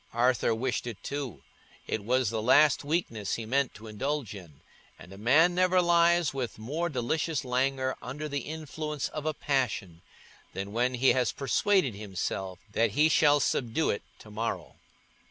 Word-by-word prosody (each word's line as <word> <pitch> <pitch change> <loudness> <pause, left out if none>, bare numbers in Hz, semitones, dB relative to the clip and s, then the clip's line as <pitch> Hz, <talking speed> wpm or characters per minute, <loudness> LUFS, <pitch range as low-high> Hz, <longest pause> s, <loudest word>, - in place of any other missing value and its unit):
Arthur 120 -1 +2
wished 125 +1 -2
it 115 -4 -7
too; 140 - -5 0.4
it 105 - -3
was 125 0 +1
the 110 -1 -2
last 145 +6 +5
weakness 145 - -1
he 115 - -5
meant 135 +3 0
to 110 - -12
indulge 125 +3 -3
in; 85 -8 -12 0.4
and 90 - -13
a - - -11
man 150 +11 +4
never 185 +1 +3
lies 170 -2 +3
with 130 -4 -4
more 150 +11 -2
delicious 150 +3 -1
languor 130 +1 0
under 150 +5 -5
the 145 -1 -2
influence 155 -1 -5
of 155 0 -5
a 155 - +1
passion 110 - -1 0.5
than 100 +1 -5
when 125 +2 +1
he 130 +2 +3
has 125 -1 +2
persuaded 160 - +1
himself 95 -2 -4
that 115 -1 +1
he 155 +2 +5
shall 145 -2 +5
subdue 130 +2 0
it 100 - -3 0.2
to 105 - -14
morrow. 115 +2 -4
130 Hz, 165 wpm, -29 LUFS, 110-150 Hz, 0.5 s, last